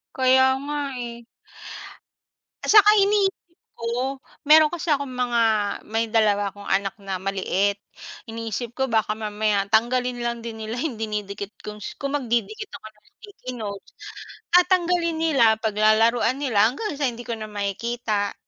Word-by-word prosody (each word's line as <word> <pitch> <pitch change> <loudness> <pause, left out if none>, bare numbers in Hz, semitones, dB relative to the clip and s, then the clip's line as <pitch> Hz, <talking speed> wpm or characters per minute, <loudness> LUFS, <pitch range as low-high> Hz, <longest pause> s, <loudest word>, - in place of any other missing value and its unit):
Kaya 260 0 +5 0.2
nga 295 +1 -3 0.2
eh. 235 -1 -6 1.5
Atsaka 420 -1 +7
inii 400 0 +4 0.5
ko 245 +4 -2 0.3
meron 310 +1 +7
kasi 345 0 -4
akong 280 -3 0
mga 245 -2 0 0.4
may 225 +1 -1
2 210 -2 +2
akong 200 +1 -13
anak 195 +1 -1
na 195 -3 -5
maliit, 195 +1 0 0.5
iniisip 230 +1 -5
ko 265 +1 -1
baka 220 -2 +1
mamaya 210 -2 -1
tanggalin 245 +3 +1
lang 235 0 -2
din 230 -1 -7
nila 230 +4 -4
dinidikit 210 -6 -4
kong 210 0 -8 0.2
kung 280 +1 -1
magdidikit 280 - -2
ako 285 -5 -10
ng 210 -1 -30 0.2
sticky 405 - -9
notes, 200 -2 -7 0.8
tanggalin 345 -2 +2
nila 295 -7 +3 0.2
paglalaruan 225 +4 +2
nila 220 -7 +3
hanggang 295 - -5
sa 290 - 0
hindi 240 0 -8
ko 230 -1 -3
na 215 - -6
makikita. 210 +1 -2
235 Hz, 135 wpm, -23 LUFS, 210-275 Hz, 1.5 s, Atsaka